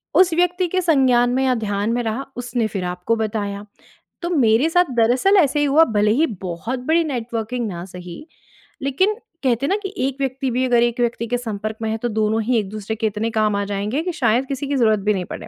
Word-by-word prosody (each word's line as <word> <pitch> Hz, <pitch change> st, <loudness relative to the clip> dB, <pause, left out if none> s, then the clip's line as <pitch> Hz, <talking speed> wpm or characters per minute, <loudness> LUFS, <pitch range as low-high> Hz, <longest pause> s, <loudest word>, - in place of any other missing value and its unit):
उस 370 Hz, -2 st, +5 dB
व्यक्ति 355 Hz, +2 st, +1 dB
के 370 Hz, +2 st, 0 dB
संज्ञान 260 Hz, -7 st, +3 dB
में 265 Hz, +1 st, +1 dB
या 260 Hz, -, +3 dB
ध्यान 205 Hz, -1 st, -1 dB
में 245 Hz, -, 0 dB
रहा 230 Hz, +4 st, -3 dB
उसने 245 Hz, -2 st, -1 dB
फ़िर 195 Hz, -3 st, -4 dB
आपको 180 Hz, +5 st, -1 dB
बताया। 205 Hz, -2 st, -3 dB, 0.6 s
तो 345 Hz, -, -2 dB
मेरे 255 Hz, -4 st, +3 dB
साथ 355 Hz, +2 st, +4 dB
दरअसल 250 Hz, -, +3 dB
ऐसे 295 Hz, -4 st, +3 dB
ही 290 Hz, -, +2 dB
हुआ 290 Hz, +3 st, +5 dB
भले 210 Hz, 0 st, +3 dB
ही 300 Hz, +7 st, +3 dB, 0.2 s
बहुत 190 Hz, +8 st, -4 dB
बड़ी 330 Hz, +1 st, +3 dB
नेटवर्किंग 240 Hz, -4 st, -3 dB
ना 175 Hz, -4 st, -5 dB
सही 180 Hz, -, -10 dB, 0.6 s
लेकिन 280 Hz, +10 st, +1 dB, 0.3 s
कहते 250 Hz, 0 st, +1 dB
हैं -, -, -1 dB
ना 390 Hz, -, +2 dB
कि 390 Hz, +1 st, -5 dB
एक 270 Hz, -1 st, -4 dB
व्यक्ति 265 Hz, -1 st, -2 dB
भी 255 Hz, +2 st, +1 dB
अगर 240 Hz, -2 st, +3 dB
एक 240 Hz, 0 st, -1 dB
व्यक्ति 235 Hz, -1 st, -1 dB
के 245 Hz, +2 st, 0 dB
संपर्क 215 Hz, -2 st, -5 dB
में 220 Hz, -, -1 dB
है। 220 Hz, -, -1 dB
तो 240 Hz, +2 st, -2 dB
दोनों 220 Hz, 0 st, 0 dB
ही 245 Hz, +2 st, +1 dB
एक-दूसरे 210 Hz, +1 st, -4 dB
के 220 Hz, 0 st, 0 dB
इतने 215 Hz, +2 st, -2 dB
काम 215 Hz, -2 st, +1 dB
आ 200 Hz, -, 0 dB
जाएँगे 205 Hz, +7 st, -2 dB
कि 360 Hz, -, -2 dB
शायद 250 Hz, -4 st, +1 dB
किसी 275 Hz, +1 st, -4 dB
की 285 Hz, -, -1 dB
ज़रूरत 220 Hz, -5 st, +3 dB
भी -, -, +4 dB
नहीं 185 Hz, -3 st, -3 dB
पड़े। -, -, -8 dB
240 Hz, 230 wpm, -21 LUFS, 215-275 Hz, 0.6 s, उस